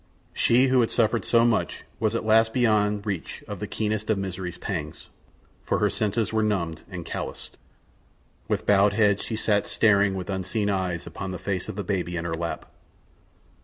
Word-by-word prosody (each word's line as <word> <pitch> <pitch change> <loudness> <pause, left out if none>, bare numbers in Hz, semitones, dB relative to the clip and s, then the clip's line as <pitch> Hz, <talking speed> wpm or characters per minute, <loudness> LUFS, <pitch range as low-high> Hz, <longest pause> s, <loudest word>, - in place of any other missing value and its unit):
She 125 +3 +4
who 130 -1 +4
had 115 - +1
suffered 115 0 +1
so 115 0 +4
much 120 -2 0 0.2
was - - +1
at - - -2
last 110 +1 +4
beyond 105 -4 +2
reach 95 -6 -4
of - - -6
the - - -4
keenest 110 0 -2
of 110 - +2
misery's 95 -2 -4
pangs, - - -5 0.5
for - - 0
her - - +2
senses 105 +1 -1
were 110 - +2
numbed 85 -7 -1
and 90 -4 -7
calloused. - - -6 0.9
With - - -1
bowed 100 0 +4
head 100 -2 +3
she 115 - -4
sat 105 -2 +1
staring 100 -3 +3
with 95 -2 -5
unseeing 100 +2 -1
eyes 90 -3 -2
upon 100 - -6
the 90 - -4
face 95 0 -3
of - - -5
the 100 - -3
baby 90 -2 -2
in 85 - -3
her 85 - -2
lap. 85 +1 -4
100 Hz, 185 wpm, -25 LUFS, 95-110 Hz, 0.9 s, She